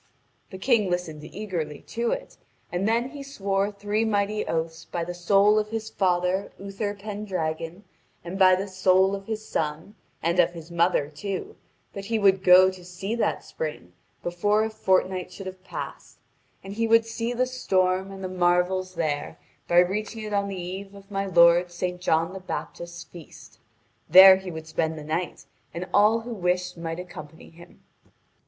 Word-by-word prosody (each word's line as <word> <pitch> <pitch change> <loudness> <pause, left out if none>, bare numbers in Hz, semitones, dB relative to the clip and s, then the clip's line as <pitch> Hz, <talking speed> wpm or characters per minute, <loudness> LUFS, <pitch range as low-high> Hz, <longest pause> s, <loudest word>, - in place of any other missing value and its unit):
The 190 - -8
King 215 -1 +2
listened 170 -4 -3
eagerly 165 -5 -5
to 235 +1 -1
it, - - -4 0.4
and 180 +3 -1
then 235 +3 +1
he 285 0 -9
swore 200 -7 -1
three 205 +2 -1
mighty 210 -1 0
oaths 160 0 -3
by 170 - -3
the 175 +1 -5
soul 200 +4 +4
of 210 0 -3
his 220 0 -4
father 180 +1 0
Utherpendragon, 200 -4 -4 0.4
and 180 +3 -6
by 185 -1 +7
the 195 +2 -3
soul 190 0 +3
of 195 0 -6
his 220 -1 -4
son, 155 +5 -3 0.3
and 170 +2 +1
of 175 - +4
his 165 0 -10
mother 170 -3 +2
too, 185 +6 -5 0.4
that 200 0 -7
he 225 +2 0
would 195 -2 +3
go 185 +1 +7
to 185 -1 -13
see 180 +4 -5
that 235 - -1
spring - - -6 0.3
before 205 +5 +1
a 220 - -2
fortnight 185 -3 0
should 195 +1 -9
have 185 0 -8
passed; - - -8 0.5
and 195 +1 -7
he 230 +2 0
would 230 0 +5
see 230 +1 -3
the 245 +1 +1
storm 190 -7 0
and 195 0 -9
the - - -2
marvels 185 +1 +1
there 145 - -2 0.3
by 175 - +2
reaching 210 +5 +1
it 210 -1 -5
on 200 0 +1
the 195 -2 -5
eve 190 +3 -7
of 200 +1 -15
my 195 0 -2
lord 170 0 +5
Saint 180 +1 -4
John 165 0 +1
the 190 - -6
Baptist's 170 -2 -6
feast; 165 -2 -14 0.5
there 190 0 +10
he 190 -1 -7
would 160 -2 -7
spend 160 0 -2
the 155 - -7
night, 165 +4 -3 0.3
and 175 +2 -4
all 215 +3 +4
who 235 +1 -6
wished 180 -2 -1
might 165 0 -5
accompany 160 -3 -10
him. 170 +1 -17
185 Hz, 175 wpm, -25 LUFS, 175-205 Hz, 0.5 s, there